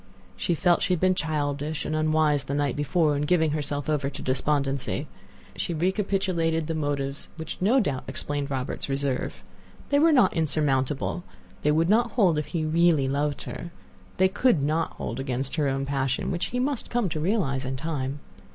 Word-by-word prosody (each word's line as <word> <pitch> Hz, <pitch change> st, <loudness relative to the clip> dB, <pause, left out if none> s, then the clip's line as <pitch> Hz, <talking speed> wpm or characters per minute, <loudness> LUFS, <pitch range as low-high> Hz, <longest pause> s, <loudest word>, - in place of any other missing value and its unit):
She 175 Hz, -, 0 dB
felt 175 Hz, +1 st, +3 dB
she 185 Hz, -, +2 dB
had 180 Hz, -, 0 dB
been 185 Hz, +1 st, +4 dB
childish 150 Hz, -2 st, -2 dB
and 155 Hz, -, -1 dB
unwise 155 Hz, -2 st, +2 dB
the 140 Hz, -, -2 dB
night 145 Hz, -3 st, 0 dB
before 150 Hz, +1 st, +2 dB
in 145 Hz, -, -1 dB
giving 160 Hz, 0 st, +2 dB
herself 145 Hz, -1 st, -2 dB
over 145 Hz, -3 st, 0 dB
to 140 Hz, -, -8 dB
despondency. 135 Hz, 0 st, 0 dB, 0.5 s
She 170 Hz, -, -2 dB
recapitulated 180 Hz, -3 st, 0 dB
the 165 Hz, -, -2 dB
motives 145 Hz, -2 st, -2 dB
which 160 Hz, +1 st, -6 dB
no 230 Hz, +8 st, +4 dB
doubt 145 Hz, -, -1 dB
explained 145 Hz, -1 st, -3 dB
Robert's 135 Hz, 0 st, -3 dB
reserve. 135 Hz, -1 st, -2 dB, 0.5 s
They 285 Hz, -, +4 dB
were 325 Hz, +2 st, +5 dB
not 250 Hz, -10 st, +5 dB
insurmountable; 150 Hz, 0 st, 0 dB, 0.4 s
they 150 Hz, -, +3 dB
would 160 Hz, +2 st, +3 dB
not 230 Hz, +4 st, +3 dB
hold 180 Hz, -10 st, +3 dB
if 150 Hz, -, -4 dB
he 165 Hz, -3 st, -2 dB
really 160 Hz, -3 st, +3 dB
loved 145 Hz, +1 st, -1 dB
her; 170 Hz, -, -6 dB, 0.5 s
they 190 Hz, -, +5 dB
could 195 Hz, -, +2 dB
not 155 Hz, +3 st, 0 dB
hold 115 Hz, +4 st, -5 dB
against 135 Hz, +2 st, -3 dB
her 150 Hz, -2 st, +2 dB
own 135 Hz, 0 st, -1 dB
passion, 135 Hz, -1 st, -1 dB
which 175 Hz, -1 st, -1 dB
he 250 Hz, -, -4 dB
must 265 Hz, -1 st, -1 dB
come 240 Hz, -4 st, +1 dB
to 155 Hz, -, -3 dB
realize 155 Hz, -7 st, 0 dB
in 130 Hz, +1 st, -3 dB
time. 140 Hz, -2 st, -3 dB
150 Hz, 180 wpm, -26 LUFS, 140-175 Hz, 0.5 s, were